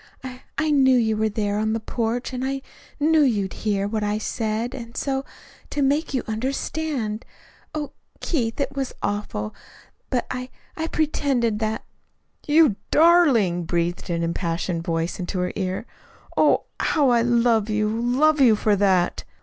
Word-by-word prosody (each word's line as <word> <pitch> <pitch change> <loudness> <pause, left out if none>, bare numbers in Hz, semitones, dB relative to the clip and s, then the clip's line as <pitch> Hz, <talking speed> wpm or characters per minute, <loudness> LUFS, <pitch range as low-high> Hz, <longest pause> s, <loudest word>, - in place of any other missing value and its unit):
I 255 -1 -8 0.2
I 310 -1 +1
knew 265 -3 +5
you 220 -2 +2
were 220 0 +1
there 205 -1 -1
on 220 0 0
the 225 - -1
porch, 235 +3 -2
and 255 0 -3
and 265 - 0
I 270 - -4 0.4
knew 315 +1 +4
you'd 210 -9 +1
hear 200 -2 -1
what 215 0 -2
I 210 0 0
said. 220 +2 -2
And 235 -3 -8
so, 270 -1 -1 0.5
to 290 - -1
make 290 +4 +1
you 260 -3 -1
understand 250 0 -2 0.5
oh, 295 -2 -3 0.3
Keith, 235 -8 -1
it 280 0 -2
was 270 -2 -3
awful, 205 - -2 0.6
but 250 - 0
I 250 0 -4 0.3
I 320 0 -2
pretended 275 -9 0
that 220 0 -2 0.3
" - - -32
"You 295 -8 +5
darling!" 275 - +4
breathed 175 +2 -1
an 170 -1 -1
impassioned 170 0 -2
voice 165 -1 -2
in 180 - -4
her 180 0 -1
ear. 185 +3 -2 0.5
"Oh, - - +4 0.2
how 285 -4 +2
I 235 -1 +4
love 230 -2 +2
you, 215 0 +1
love 250 +7 +2
you 235 -5 +7
for 210 0 +2
that!" 190 -3 +2
230 Hz, 165 wpm, -23 LUFS, 205-270 Hz, 0.6 s, you